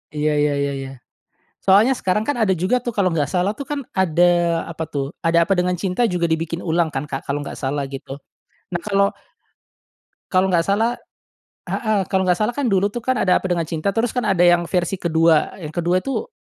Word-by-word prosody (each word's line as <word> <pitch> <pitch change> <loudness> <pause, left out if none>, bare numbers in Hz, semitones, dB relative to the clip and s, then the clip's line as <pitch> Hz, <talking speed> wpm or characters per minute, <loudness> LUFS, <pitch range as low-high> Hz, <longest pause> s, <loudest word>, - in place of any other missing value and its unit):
Iya 150 0 +1
iya 145 0 +2
iya 140 0 0
iya. 135 0 -6 0.7
Soalnya 210 +7 +5
sekarang, 210 0 -1
kan, 290 - 0
ada 220 -5 +2
juga, 190 +8 0
tuh, 240 - -2
kalau 200 -4 +1
enggak 145 -4 0
salah, 185 +3 0
tuh, 280 - -6
kan, 295 -1 -2 0.2
ada 175 -2 +3 0.4
apa, 160 0 -5
tuh, 140 0 -3
Ada 170 0 +3
Apa 195 - +3
Dengan 180 0 +1
Cinta 190 +5 0
juga 175 -2 0
dibikin 165 +1 -2
ulang, 165 -1 0
kan, 135 +1 -4
Kak, 135 -2 -5
kalau 140 +1 -2
enggak - - -6
salah 140 +1 -2
gitu. 135 0 -8 0.5
Nah, 175 - -1
kalau 200 -1 +2 1.2
kalau 185 0 +2
enggak 170 -2 +2
salah 225 +5 +1 0.7
heeh, 215 -4 0
kalau 190 -1 +2
enggak 180 - +4
salah, 215 +3 +1
kan, 285 -2 0
dulu, 200 0 +1
tuh, 240 - -4
kan, 260 0 +1
Ada 180 - +3
Apa - - -4
Dengan 175 -2 0
Cinta 160 +3 -3
terus, 225 0 +1
kan, 250 -2 -1
ada 185 -3 +3
yang 175 -1 +4
versi 180 +1 0
ke-2, 165 -2 +2
yang 155 -3 -7
ke-2 175 +2 +1
itu 275 - -3
180 Hz, 210 wpm, -21 LUFS, 160-200 Hz, 1.2 s, Soalnya